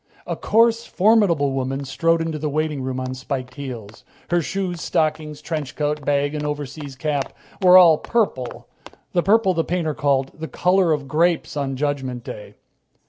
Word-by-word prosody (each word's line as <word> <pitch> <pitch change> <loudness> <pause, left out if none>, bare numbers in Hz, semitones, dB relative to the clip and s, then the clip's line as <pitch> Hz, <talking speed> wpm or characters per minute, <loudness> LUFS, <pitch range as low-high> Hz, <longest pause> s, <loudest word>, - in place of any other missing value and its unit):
A - - -3
coarse, 230 +1 +2
formidable 190 -9 +3
woman 135 +1 -2
strode 165 +5 +1
into 160 -2 -3
the 150 0 -2
waiting 150 -1 -1
room 130 0 -3
on 130 0 -4
spike 130 0 -5
heels. 120 -7 -8 0.3
Her 175 0 +3
shoes, 180 0 -3
stockings, 155 -1 -1
trench 155 -5 -4
coat, 150 0 -1
bag 145 +1 +1
and 150 -1 -3
overseas 145 -1 -5
cap 145 0 -2 0.3
were 185 -1 +8
all 170 -4 +7
purple, 195 - -2 0.5
the 175 - +3
purple 200 0 +3
the 165 -1 0
painter 165 -3 -1
called 140 -2 0
"the 160 0 -7
color 180 0 +2
of 145 -3 -1
grapes 165 +4 +1
on 140 -2 -2
Judgment 135 -3 -2
Day." 105 - -9
150 Hz, 165 wpm, -22 LUFS, 135-170 Hz, 0.5 s, were